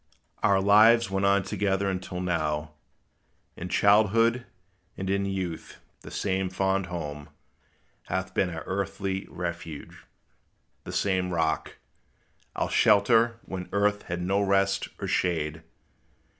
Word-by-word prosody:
Our 100 Hz, -1 st, +4 dB
lives 110 Hz, +2 st, +5 dB
went 95 Hz, 0 st, +1 dB
on 100 Hz, 0 st, +3 dB
together 100 Hz, 0 st, -1 dB
until 90 Hz, -1 st, -3 dB
now. 75 Hz, -4 st, -1 dB, 0.8 s
In 90 Hz, -, -6 dB
childhood 115 Hz, +5 st, +3 dB, 0.5 s
and 95 Hz, -, -4 dB
in 100 Hz, 0 st, 0 dB
youth 95 Hz, -4 st, -4 dB, 0.2 s
the -, -, -10 dB
same 95 Hz, -1 st, -1 dB
fond 95 Hz, 0 st, 0 dB
home 75 Hz, -5 st, -6 dB, 0.8 s
Hath 95 Hz, +1 st, -3 dB
been 95 Hz, -, +1 dB
our 80 Hz, -2 st, -6 dB
earthly 95 Hz, 0 st, -3 dB
refuge; 85 Hz, -3 st, -7 dB, 0.8 s
the -, -, -6 dB
same 95 Hz, -2 st, 0 dB
Rock 80 Hz, -3 st, -1 dB, 0.8 s
Our -, -, -2 dB
shelter 115 Hz, +3 st, +4 dB
when 90 Hz, -1 st, -6 dB
earth 105 Hz, 0 st, +1 dB
had 90 Hz, 0 st, -4 dB
no 100 Hz, +3 st, +1 dB
rest 100 Hz, 0 st, +1 dB
or -, -, -4 dB
shade. 80 Hz, -3 st, -1 dB
95 Hz, 120 wpm, -27 LUFS, 90-100 Hz, 0.8 s, lives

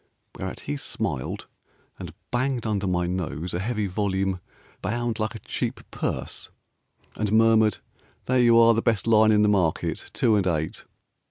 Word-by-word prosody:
Whereat -, -, -6 dB
he 75 Hz, -, -4 dB
smiled 65 Hz, -, -3 dB, 0.5 s
and -, -, -7 dB, 0.2 s
banged 125 Hz, -1 st, 0 dB
under 100 Hz, -3 st, -1 dB
my 90 Hz, -1 st, +1 dB
nose 90 Hz, -1 st, -3 dB
A 85 Hz, -, -1 dB
heavy 105 Hz, +1 st, -1 dB
volume, 95 Hz, -1 st, -1 dB, 0.4 s
Bound 120 Hz, +2 st, -2 dB
like 110 Hz, +2 st, -2 dB
a -, -, -6 dB
cheap -, -, -3 dB
purse, -, -, -4 dB, 0.7 s
And 105 Hz, -1 st, -1 dB
murmured, 110 Hz, -2 st, +4 dB, 0.5 s
"There 130 Hz, 0 st, +2 dB
you 120 Hz, -1 st, +6 dB
are, 115 Hz, 0 st, +7 dB
The 115 Hz, -, +1 dB
best 115 Hz, -4 st, +1 dB
line 110 Hz, -1 st, +5 dB
in 105 Hz, -1 st, +4 dB
the -, -, +4 dB
market, 95 Hz, -6 st, 0 dB
Two 110 Hz, -, +2 dB
and 95 Hz, -2 st, +1 dB
eight." 80 Hz, -3 st, -2 dB
105 Hz, 160 wpm, -25 LUFS, 95-115 Hz, 0.7 s, are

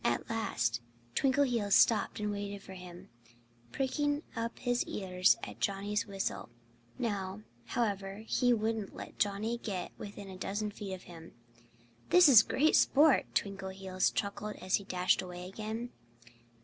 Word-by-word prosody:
At 120 Hz, -, 0 dB
last 115 Hz, -, 0 dB, 0.3 s
Twinkleheels 250 Hz, -, +2 dB
stopped 220 Hz, -2 st, +4 dB
and 210 Hz, 0 st, -1 dB
waited 200 Hz, -1 st, -5 dB
for 190 Hz, -, -10 dB
him, 180 Hz, -1 st, -11 dB, 0.6 s
pricking 290 Hz, +3 st, 0 dB
up 230 Hz, 0 st, -3 dB
his 245 Hz, -1 st, 0 dB
ears 185 Hz, -1 st, +2 dB
at -, -, -7 dB
Johnnie's 205 Hz, +2 st, -1 dB
whistle. 195 Hz, -, -3 dB, 0.5 s
Now, 200 Hz, -3 st, -3 dB, 0.2 s
however, 200 Hz, -2 st, -2 dB
he 245 Hz, +2 st, +2 dB
wouldn't 220 Hz, -2 st, -1 dB
let -, -, -9 dB
Johnnie 215 Hz, +3 st, 0 dB
get 190 Hz, -6 st, -4 dB
within 205 Hz, -1 st, -8 dB
a 190 Hz, -1 st, -9 dB
dozen 205 Hz, +3 st, -2 dB
feet 200 Hz, -1 st, -6 dB
of 185 Hz, -, -13 dB
him. 165 Hz, -2 st, -12 dB, 0.8 s
"This 360 Hz, -2 st, +8 dB
is 245 Hz, -6 st, +10 dB
great 305 Hz, +7 st, +2 dB
sport!" 290 Hz, 0 st, +5 dB
Twinkleheels 190 Hz, -1 st, -1 dB
chuckled 205 Hz, 0 st, -3 dB
as 185 Hz, 0 st, +1 dB
he 200 Hz, -, -9 dB
dashed 180 Hz, -2 st, +2 dB
away 180 Hz, -1 st, -7 dB
again. 220 Hz, +5 st, -5 dB
205 Hz, 140 wpm, -32 LUFS, 190-230 Hz, 0.8 s, is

